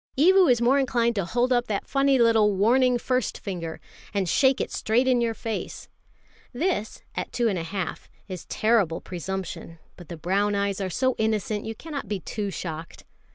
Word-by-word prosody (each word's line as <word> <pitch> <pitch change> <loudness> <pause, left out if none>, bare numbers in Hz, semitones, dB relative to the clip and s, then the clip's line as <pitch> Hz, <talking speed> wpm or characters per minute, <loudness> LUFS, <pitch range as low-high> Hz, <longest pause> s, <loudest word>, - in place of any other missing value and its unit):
Evu 370 +3 +6
is 240 -2 +3
more 265 +4 +4
inclined 240 -3 +1
to 200 -5 -1
hold 245 +7 +1
up 240 0 +1
that 205 -2 -2
funny 275 -1 +3
little 225 -4 +4
warning 245 +5 +3
first 255 0 -1
finger, 170 -4 -5 0.4
and 195 -2 +1
shake 265 - +3
it - - -2
straight 240 +4 +1
in 250 -2 +3
your 230 -1 0
face. 220 +1 -5 0.6
This, 265 - -2
at - - -4
two 240 -1 +1
and 195 -5 0
a - - -3
half, 175 0 -5 0.2
is 185 -3 -7
terrible 210 -7 +2
presumption; 185 -2 -6 0.2
but 175 -3 -13
the 170 - -6
brown 200 +5 0
eyes 200 0 -1
are 190 - -2
so 260 +7 +1
innocent, 215 -1 -1
you 225 - -4
cannot 290 -3 -6
be 205 -1 -2
too 205 +4 -4
shocked. 165 -3 -6
220 Hz, 185 wpm, -25 LUFS, 190-250 Hz, 0.6 s, Evu